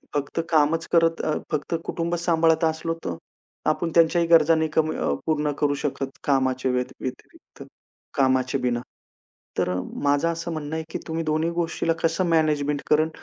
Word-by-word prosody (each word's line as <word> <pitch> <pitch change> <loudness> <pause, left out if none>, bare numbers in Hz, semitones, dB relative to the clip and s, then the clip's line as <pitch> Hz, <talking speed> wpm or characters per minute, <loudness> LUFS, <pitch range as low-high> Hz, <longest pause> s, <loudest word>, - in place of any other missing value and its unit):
फक्त 145 +3 -2
कामच 160 +1 +2
करत 165 -1 +3
अ, 155 - 0 0.2
फक्त 155 +2 -1
कुटुंब 170 0 -2
सांभाळत 165 -1 +3
असलो 160 +1 -1
तर 85 - -2 0.5
आपण 165 -1 0
त्यांच्याही 170 0 +4
गरज 165 -1 +6
नाही 160 -1 +2
कमी 155 0 +1
अ, 70 - 0
पूर्ण 150 -2 +1
करू 145 -1 +3
शकत 135 -1 -3
कामाच्या 130 -2 +1
व्यत 125 0 -2
व्यतिरिक्त, 130 - -9 0.5
कामाचे 130 0 +2
बिना. 120 -2 0 0.8
तर - - +1
अ, - - -1 0.3
माझं 145 +3 +2
असं 170 +1 -4
म्हणणं 155 0 -4
आहे, 160 - -2
की - - -4
तुम्ही 165 0 -2
दोन्ही 155 +2 +1
गोष्टीला 170 -1 0
कसं 165 +3 +1
मॅनेजमेंट 150 -3 +1
करणं 155 +1 +4
155 Hz, 165 wpm, -24 LUFS, 145-165 Hz, 0.8 s, गरज